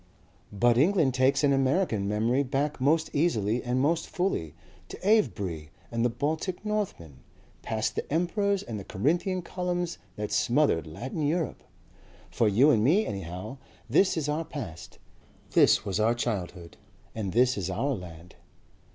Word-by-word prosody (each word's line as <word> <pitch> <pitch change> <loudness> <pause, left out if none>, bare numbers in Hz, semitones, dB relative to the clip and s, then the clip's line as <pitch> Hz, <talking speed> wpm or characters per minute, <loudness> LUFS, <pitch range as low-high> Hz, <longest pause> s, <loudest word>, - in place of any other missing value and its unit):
"But 120 +3 +3
England 160 -4 +3
takes 130 +3 +2
an 140 -1 +4
American 135 - +1
memory 115 +6 +1
back 140 +1 -2
most 155 +4 +2
easily 120 - +1
and 125 +1 -1
most 165 +5 +1
fully 175 - -2 0.3
to - - -8
Avebury 95 - +1 0.2
and 115 0 -1
the 120 - +3
Baltic 160 - -3
Northmen, 190 - -3 0.4
past 110 0 -2
the - - -4
emperors 195 +5 0
and 110 -3 -6
the - - -7
Corinthian 175 - -1
columns 175 -1 -3 0.2
that 105 0 -4
smothered 120 - +2
Latin 130 - -5
Europe.... 155 +2 -1 0.7
For 115 - +2
you 120 +9 +5
and 110 -6 +3
me 185 - +3
anyhow 95 +6 -6 0.3
this 170 - +3
is 150 -2 -1
our 150 +2 -1
past, 115 - -8 0.5
this - - +4
was 100 0 -1
our 115 +2 +3
childhood, 90 -7 -4 0.4
and 105 -4 -3
this 125 +4 +3
is 95 -2 -3
our 135 +10 -1
land." 90 -4 -9
130 Hz, 150 wpm, -28 LUFS, 105-160 Hz, 0.7 s, you